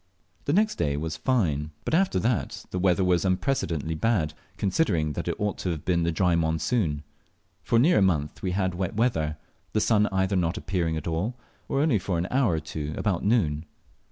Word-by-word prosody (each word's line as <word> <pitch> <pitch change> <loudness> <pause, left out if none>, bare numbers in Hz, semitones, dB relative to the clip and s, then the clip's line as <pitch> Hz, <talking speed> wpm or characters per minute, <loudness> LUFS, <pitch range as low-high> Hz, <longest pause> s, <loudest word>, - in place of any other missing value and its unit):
The 140 - +1
next 215 +4 +2
day 70 -1 +1
was 80 +1 -3
fine, 80 - 0 0.2
but - - -2
after 180 - +3
that 115 +1 -1
the 90 - -2
weather 95 0 +3
was 90 -1 +2
unprecedentedly 90 - 0
bad, 80 -3 +1 0.2
considering 90 - +1
that - - -4
it - - 0
ought 105 -1 -1
to 90 - -2
have 80 -4 -4
been 85 -2 +2
the 85 0 +1
dry 90 +1 +2
monsoon. 80 0 0 0.6
For 115 - +1
near 140 +3 +5
a - - +2
month 80 -6 +1
we 95 - -1
had 95 -1 0
wet 90 +1 -3
weather; 80 -10 +1 0.4
the 110 - +2
sun 105 -1 +3
either 95 +1 0
not 85 -1 0
appearing 85 -3 -1
at 80 - -5
all, 85 +9 -1 0.3
or 140 - +1
only 145 -9 +3
for 90 -1 -2
an 85 +2 -1
hour 130 -8 +3
or - - 0
two 75 -1 -5
about 95 -5 0
noon. 85 -9 +1
90 Hz, 200 wpm, -26 LUFS, 80-105 Hz, 0.6 s, near